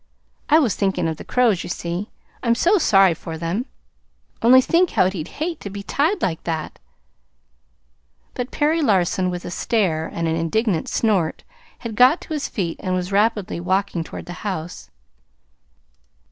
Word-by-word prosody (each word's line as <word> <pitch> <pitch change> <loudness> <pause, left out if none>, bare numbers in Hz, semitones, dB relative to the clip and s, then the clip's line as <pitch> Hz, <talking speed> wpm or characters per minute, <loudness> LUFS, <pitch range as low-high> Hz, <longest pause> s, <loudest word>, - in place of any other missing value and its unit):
I 310 - +7
was 265 -10 +3
thinking 190 -4 0
of 160 -1 -3
the - - -8
crows, 235 -8 +2
you - - -7
see. 175 +4 -4 0.3
I'm 235 -1 +2
so 365 - +3
sorry 195 - +5
for 160 0 -7
them! 175 - -2 0.7
Only 250 +3 +7
think 340 +7 +3
how 185 - +3
we'd 180 -4 -4
hate 320 - -4
to 200 - -7
be 200 +1 -7
tied 320 - 0
like 165 -3 -1
that 160 -2 -4 0.8
" - - -43
But 250 0 -4
Perry 315 +2 +1
Larson, 185 - +2
with 180 -1 -5
a - - -5
stare 175 -6 0
and 170 -1 -3
an 160 - 0
indignant 170 +2 0
snort, 195 -8 0 0.4
had 230 -3 -5
got 255 +9 +5
to 320 - -7
his 295 -2 -2
feet, 175 -6 -3
and 185 -1 -1
was 180 +1 -3
rapidly 205 -3 +1
walking 185 0 -1
toward - - -9
the 175 - -7
house. 180 -5 -5
195 Hz, 170 wpm, -21 LUFS, 170-240 Hz, 0.8 s, I